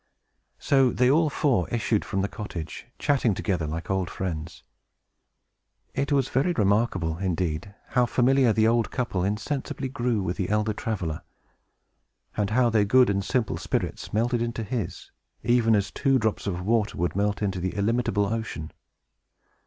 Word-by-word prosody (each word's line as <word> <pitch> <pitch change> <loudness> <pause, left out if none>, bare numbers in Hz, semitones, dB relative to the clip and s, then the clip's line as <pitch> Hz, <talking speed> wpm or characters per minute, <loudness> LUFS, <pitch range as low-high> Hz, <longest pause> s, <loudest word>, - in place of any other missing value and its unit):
So 135 -2 +3
they 125 +1 +3
all 160 +1 +4
four 135 - +1
issued 110 -2 0
from 95 0 -2
the - - +1
cottage, 90 -4 -7
chatting 130 -8 +2
together 90 -5 -1
like 85 +5 -4
old 95 -2 0
friends. 80 -4 -5 1.3
It 140 +2 -1
was 135 -3 +3
very 155 +7 +1
remarkable, 100 - +1
indeed, 90 0 -2
how 125 -2 +2
familiar 130 0 +3
the 110 0 +3
old 115 0 +2
couple 120 -8 -2
insensibly 130 +7 -2
grew 120 -6 -1
with 90 0 -2
the 95 - -2
elder 105 +1 +1
traveler, 95 -8 -3 1.1
and 105 -2 0
how 120 +1 +3
their 110 -2 +4
good 125 +2 +5
and 100 0 0
simple 105 +3 0
spirits - - -3
melted 120 +2 +1
into 115 -1 -2
his, 105 -4 -4 0.3
even 120 -2 +4
as 100 0 0
two 135 -2 +2
drops 110 -3 -1
of 90 -2 -2
water 110 -1 +1
would 90 +1 -1
melt 105 +1 0
into 95 -2 -1
the 90 +1 -3
illimitable 105 0 +1
ocean. 105 -7 -4
105 Hz, 155 wpm, -26 LUFS, 95-125 Hz, 1.3 s, good